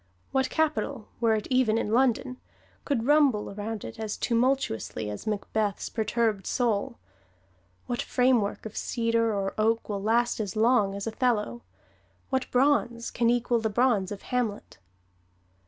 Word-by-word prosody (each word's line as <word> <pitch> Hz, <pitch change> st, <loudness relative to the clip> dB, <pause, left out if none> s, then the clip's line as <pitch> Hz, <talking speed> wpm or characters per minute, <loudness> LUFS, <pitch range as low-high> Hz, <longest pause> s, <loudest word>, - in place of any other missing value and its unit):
What 265 Hz, -1 st, +1 dB
capital, 295 Hz, -6 st, -1 dB
were 230 Hz, -2 st, +3 dB
it 215 Hz, -, -3 dB
even 250 Hz, -4 st, +3 dB
in 210 Hz, -, -1 dB
London, 255 Hz, +1 st, +2 dB, 0.5 s
could 245 Hz, -6 st, 0 dB
rumble 280 Hz, -8 st, +3 dB
around 210 Hz, +1 st, -5 dB
it 115 Hz, -, -9 dB
as 215 Hz, -1 st, -3 dB
tumultuously 235 Hz, -, 0 dB
as 105 Hz, -, -8 dB
Macbeth's 210 Hz, 0 st, -1 dB
perturbed 220 Hz, -2 st, 0 dB
soul? 225 Hz, -5 st, 0 dB, 0.9 s
What 245 Hz, -, -2 dB
framework 245 Hz, -6 st, +1 dB
of 220 Hz, -, -7 dB
cedar 230 Hz, -1 st, 0 dB
or 195 Hz, -2 st, -2 dB
oak 225 Hz, +1 st, +1 dB
will 200 Hz, -1 st, -2 dB
last 235 Hz, +3 st, +1 dB
as 205 Hz, -2 st, -3 dB
long 215 Hz, -3 st, +3 dB
as 200 Hz, -, -4 dB
"Othello"? 220 Hz, -, 0 dB, 0.7 s
What 260 Hz, -1 st, 0 dB
bronze 250 Hz, -3 st, +1 dB
can 235 Hz, -1 st, +1 dB
equal 240 Hz, 0 st, +2 dB
the 220 Hz, -1 st, -1 dB
bronze 215 Hz, -4 st, +2 dB
of 205 Hz, -, -7 dB
"Hamlet"? 235 Hz, -, -3 dB
230 Hz, 140 wpm, -27 LUFS, 210-250 Hz, 0.9 s, were